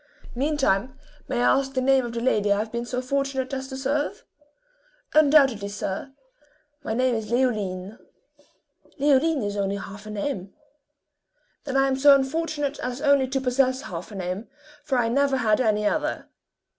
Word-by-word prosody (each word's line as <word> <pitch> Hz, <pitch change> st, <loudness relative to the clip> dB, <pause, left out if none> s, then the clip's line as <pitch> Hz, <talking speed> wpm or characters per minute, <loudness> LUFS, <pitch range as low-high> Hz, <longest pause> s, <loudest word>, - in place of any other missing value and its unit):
Meantime, 260 Hz, -4 st, 0 dB, 0.3 s
may 250 Hz, -3 st, -1 dB
I 270 Hz, -, +4 dB
ask 270 Hz, 0 st, -5 dB
the -, -, +2 dB
name 265 Hz, 0 st, +3 dB
of 235 Hz, -1 st, -5 dB
the 235 Hz, -, -3 dB
lady 210 Hz, -4 st, +1 dB
I 200 Hz, -, +4 dB
have 215 Hz, +1 st, -3 dB
been 235 Hz, 0 st, -4 dB
so 250 Hz, +1 st, -3 dB
fortunate 275 Hz, 0 st, -2 dB
as 265 Hz, 0 st, -3 dB
to 265 Hz, -1 st, -7 dB
serve!" 290 Hz, +9 st, -2 dB, 0.9 s
"Undoubtedly, 275 Hz, -8 st, +4 dB
sir 200 Hz, +5 st, -4 dB, 0.7 s
my 220 Hz, -, -2 dB
name 255 Hz, +1 st, +2 dB
is 220 Hz, -2 st, -3 dB
Leoline." 215 Hz, -5 st, -1 dB, 1.0 s
"Leoline 285 Hz, 0 st, +3 dB
is 205 Hz, 0 st, -3 dB
only 200 Hz, -1 st, -1 dB
half 200 Hz, +1 st, -8 dB
a -, -, -7 dB
name." 200 Hz, -2 st, -4 dB, 1.1 s
"Then 270 Hz, -2 st, -1 dB
I 270 Hz, 0 st, +4 dB
am 265 Hz, -1 st, 0 dB
so 280 Hz, +1 st, +7 dB
unfortunate 290 Hz, +1 st, -1 dB
an 250 Hz, 0 st, -4 dB
only 280 Hz, -2 st, +4 dB
to 270 Hz, +1 st, -1 dB
possess 260 Hz, +1 st, +1 dB
half 175 Hz, +3 st, -7 dB
a -, -, -9 dB
name, 185 Hz, +3 st, -4 dB, 0.4 s
for 275 Hz, -4 st, 0 dB
I 240 Hz, -2 st, +2 dB
never 275 Hz, +3 st, +2 dB
had 220 Hz, -2 st, +2 dB
any 210 Hz, -3 st, +1 dB
other." 305 Hz, +7 st, -1 dB
255 Hz, 170 wpm, -24 LUFS, 215-275 Hz, 1.1 s, so